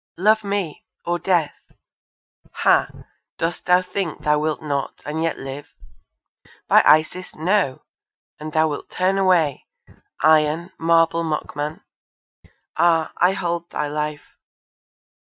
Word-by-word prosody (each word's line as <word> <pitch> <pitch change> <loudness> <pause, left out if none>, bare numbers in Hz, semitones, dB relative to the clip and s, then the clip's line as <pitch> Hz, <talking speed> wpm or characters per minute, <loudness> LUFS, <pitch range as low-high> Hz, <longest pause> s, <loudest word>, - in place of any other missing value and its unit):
Love 215 +4 +3
me! 200 -6 -3 0.2
or 175 0 -1
death! 170 -6 0 0.9
Ha! - - +3 0.5
dost 165 +1 -3
thou 180 0 +4
think 180 -3 -4
thou 150 0 +2
wilt 155 0 -1
not, 140 -2 -3
and 155 +2 -3
yet 165 0 -1
live? 135 +2 -8 0.9
By - - +6
Isis, 155 +4 +3
no. 165 -4 0 0.6
And 155 +1 -6
thou 160 +1 +2
wilt 145 -2 -5
turn 190 +2 0
away, 175 -6 +2 0.5
Iron, 155 +3 +3
marble 165 0 +3
mockman! 150 -1 -4 0.9
Ah! 165 -2 +2
I 180 +2 +3
hold 170 -2 -3
thy 150 -1 -3
life! 150 0 -4
165 Hz, 120 wpm, -21 LUFS, 150-180 Hz, 0.9 s, By